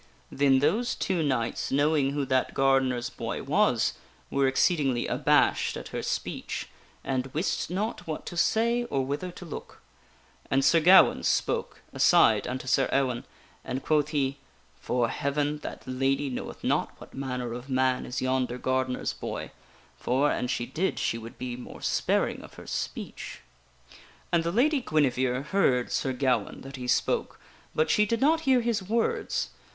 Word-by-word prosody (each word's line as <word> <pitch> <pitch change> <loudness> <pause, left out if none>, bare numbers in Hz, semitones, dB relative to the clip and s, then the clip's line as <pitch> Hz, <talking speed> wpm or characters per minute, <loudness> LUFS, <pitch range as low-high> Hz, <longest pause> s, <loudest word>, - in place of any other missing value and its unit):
Then 135 -1 +4
those 215 +12 +1
two 185 -3 -1
knights, 130 -6 -1
knowing 145 0 +2
who 140 0 -1
that 130 -1 0
gardener's 130 -3 +2
boy - - -4
was, - - +2 0.4
were 140 -1 +2
exceedingly 135 -3 +2
abashed - - +2
at - - -8
her - - -4
speech, - - -4 0.3
and 130 -1 -1
wist 165 +6 -1
not 200 +4 -3
what 155 - -4
to - - -6
say 235 +7 +2
or 135 - -1
whither 145 +7 -3
to 175 - -10
look. 165 - -8 0.7
And 135 0 +2
Sir 165 +4 +5
Gawaine 180 +4 +6
spake, - - 0 0.2
aside - - +4
unto 130 0 -4
Sir 130 +1 +2
Ewaine, 130 -3 0 0.4
and 130 - -4
quoth 150 -2 +2
he: 140 -2 -1 0.2
" - - -34
'Fore 120 -1 +1
Heaven, 145 +3 -1
that - - -7
lady 135 +2 0
knoweth 125 - -6
not - - 0
what - - -13
manner 125 -3 -4
of 125 +3 -8
man 130 -1 +1
is 125 - -3
yonder 130 -1 0
gardener's 130 0 -1
boy; - - -6 0.5
for, 135 +4 +2
an 125 - -1
she 120 -1 -1
did, 165 +10 -1
she 115 - -1
would 115 +1 -10
be 125 -1 -4
more 125 - -10
sparing - - 0
of - - -13
her - - -11
speech." - - -5 0.9
And 170 -1 +3
the 170 - -1
Lady 275 - +3
Guinevere 130 - +1
heard 140 -7 +1
Sir 135 - 0
Gawaine 125 -4 0
that 135 0 -9
he 125 -1 -6
spoke, 125 - 0 0.4
but 155 0 +2
she 210 0 +3
did 230 +2 0
not 320 +4 +3
hear 255 -2 +5
his 230 -3 0
words. 225 +5 -1
135 Hz, 165 wpm, -27 LUFS, 130-165 Hz, 0.9 s, Gawaine